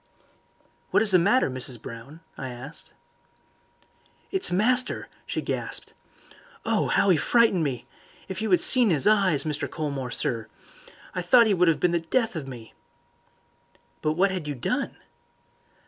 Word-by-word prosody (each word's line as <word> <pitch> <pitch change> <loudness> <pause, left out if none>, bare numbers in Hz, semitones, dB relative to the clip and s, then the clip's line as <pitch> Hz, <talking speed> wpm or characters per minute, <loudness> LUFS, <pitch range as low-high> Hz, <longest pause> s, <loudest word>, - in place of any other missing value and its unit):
"What - - +3
is 215 - +4
the 185 - +6
matter, 225 +9 +3
Mrs. 130 -2 -1
Brown?" 115 +9 -10
I 130 - -6
asked. 125 +5 -10 1.4
"It's 385 - +2
master!" 245 +7 +1 0.2
she - - -3
gasped. - - -4 0.7
"Oh, - - +1
'ow 200 - +4
'e 175 - +4
frightened 225 -3 +3
me! 130 -5 -3 0.4
If 190 +2 -5
you 220 - -1
had 180 - +4
seen 245 -6 +4
'is 150 -5 +2
eyes, 195 -9 +3
Mr. 150 -2 -3
Colmore, 140 -4 -4
sir. 115 -2 -3 0.7
I 180 - -2
thought 235 +7 +5
'e 215 - +2
would 180 -2 +3
'ave 160 - +2
been 180 - +1
the 170 - +1
death 220 +7 -1
of 150 -4 -5
me." 120 -4 -10 1.3
"But 155 - 0
what 190 +4 +2
had 180 -5 -4
you 145 - -3
done?" 125 - -2
170 Hz, 155 wpm, -25 LUFS, 135-205 Hz, 1.4 s, the